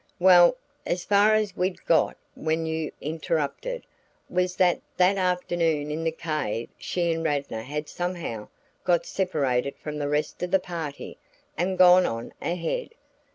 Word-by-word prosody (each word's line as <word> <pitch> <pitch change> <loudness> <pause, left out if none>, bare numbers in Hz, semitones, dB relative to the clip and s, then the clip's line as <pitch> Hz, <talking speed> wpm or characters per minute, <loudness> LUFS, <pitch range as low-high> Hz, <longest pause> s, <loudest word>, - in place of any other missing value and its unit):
"Well, 180 +4 +7 0.3
as 175 0 -2
far 205 +1 +5
as 215 -3 0
we'd 180 0 -2
got 165 - +3 0.2
when 160 +1 -1
you 160 -1 -2
interrupted, 165 - -2 0.5
was 180 0 0
that 180 -1 +3 0.2
that 185 +2 +4
afternoon 175 -5 0
in 160 +2 -3
the 165 - +1
cave 155 -8 -3
she 170 -2 0
and 165 0 -3
Radnor 140 -7 -1
had 150 +5 -5
somehow 175 -12 -4 0.4
got 175 -2 +2
separated 140 -8 0
from 150 -1 -6
the 145 -1 -1
rest 150 +1 -1
of 180 - -1
the 190 - +4
party 165 -6 -6 0.4
and 185 +2 -1
gone 180 0 +7
on 115 +1 -5
ahead. 180 - -3
170 Hz, 150 wpm, -26 LUFS, 150-180 Hz, 0.5 s, Well